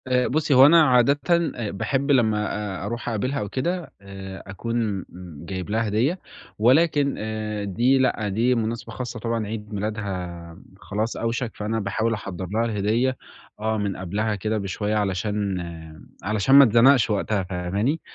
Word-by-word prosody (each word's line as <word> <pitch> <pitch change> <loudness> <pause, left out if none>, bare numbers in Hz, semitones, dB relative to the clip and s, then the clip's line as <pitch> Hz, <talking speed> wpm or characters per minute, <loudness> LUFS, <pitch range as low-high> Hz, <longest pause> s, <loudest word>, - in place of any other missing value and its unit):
آآ 125 -1 +2
بُصّي، 150 +1 +1
هو 130 +1 +8
أنا 165 +3 +7
عادةً 130 +1 +4 0.4
آآ 115 -4 -4
باحب 135 +8 -1
لمّا 110 -5 +2 0.3
أ - - -5
أروح 120 +3 -4
أقابلها 130 +5 -1
أو 105 - -4
كده، 165 - -3
آآ 95 -1 -9
أكون 105 -1 -2 0.4
جايب 95 +1 -5
لها 110 +1 0
هدية، 125 - 0 0.4
ولكن 140 +4 +3
آآ 110 -1 -4
دي 120 +7 +2
لأ، 130 -5 +1
دي 115 +6 +2
مناسبة 115 0 -3
خاصة 120 +1 -5
طبعًا 115 -1 -2
عيد 105 0 -6
ميلادها 95 -5 -5 0.2
خلاص 105 +3 -3
أوشَك، 115 0 -2
فأنا 110 +2 -2
باحاول 110 +3 -1
أحضّر 95 -3 -5
لها 115 +2 +1
الهدية، 115 +4 0 0.4
آه 110 +1 -1
من 100 -2 -2
قبلها 105 +4 -2
كده 110 +2 -2
بشوية 105 +1 -2
علشان- 100 0 -1 0.7
علشان 110 +6 +2
ما 140 - +10
أتزنقش 125 +2 +5
وقتها 100 -1 0
فاهماني؟ 95 - -2
110 Hz, 150 wpm, -24 LUFS, 100-125 Hz, 0.7 s, ما